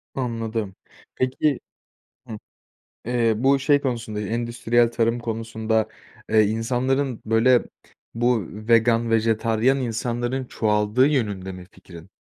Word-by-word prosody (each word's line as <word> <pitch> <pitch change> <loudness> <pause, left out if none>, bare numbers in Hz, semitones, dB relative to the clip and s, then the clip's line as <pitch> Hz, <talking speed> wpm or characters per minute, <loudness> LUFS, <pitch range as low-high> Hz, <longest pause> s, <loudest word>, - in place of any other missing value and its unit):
Anladım, 115 -5 -3 0.4
peki 130 +2 0 0.7
Hımm, 110 -3 -7 0.7
eee, 115 -1 +1
bu, 135 +4 +3
şey, 145 +1 +3
konusunda, 115 -6 -3
eee, 105 - -4
endüstriyel 120 +1 +1
tarım 115 0 +1
konusunda, 110 -1 -2 0.4
eee, 110 0 +5
insanların 125 +4 -1
böyle 115 +3 +4 0.5
bu 120 -4 +1
vegan, 115 +2 +2
vejetaryen 115 +3 +2
insanların 120 +1 -2
çoğaldığı 105 +2 +1
yönünde 105 -10 -1
mi 90 -1 -10
fikrin? 90 -1 -14
115 Hz, 110 wpm, -23 LUFS, 110-125 Hz, 0.7 s, eee